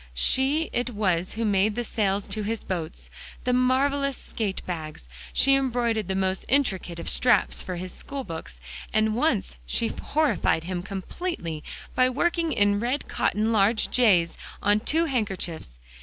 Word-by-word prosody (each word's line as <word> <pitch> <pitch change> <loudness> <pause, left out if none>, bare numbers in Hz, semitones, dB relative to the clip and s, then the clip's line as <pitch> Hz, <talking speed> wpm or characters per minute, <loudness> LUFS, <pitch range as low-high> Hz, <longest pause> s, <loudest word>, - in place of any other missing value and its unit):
She 275 - +2
it 245 +1 0
was 185 -6 0
who 225 +1 -2
made 205 0 +2
the 240 - -1
sails 200 -4 0
to 215 - -2
his 220 +2 -2
boats, 155 - -5 0.3
and 250 0 +3
marvelous 275 +1 +2
skate 205 -4 -4
bags. 155 - -6 0.2
She 275 - +4
embroidered 240 -6 +1
the 190 - -1
most 190 0 0
intricate 195 -11 +1
of 170 - -6
straps 250 -1 +3
for 185 - -5
his 180 +1 -6
school 275 -1 -6
books, 160 - -8 0.3
and 215 0 +2
once 60 - 0
she 70 - 0
horrified 285 - +1
him 180 0 -3
completely 190 - -4 0.3
by 255 0 +4
working 330 +5 +1
in 205 -3 +3
red 245 +6 -1
cotton, 215 +2 +1
large 215 +1 +3
"J's" 185 -9 +4 0.3
on 205 +1 +4
two 320 +9 +1
handkerchiefs. 190 - -3
215 Hz, 155 wpm, -26 LUFS, 180-255 Hz, 0.3 s, She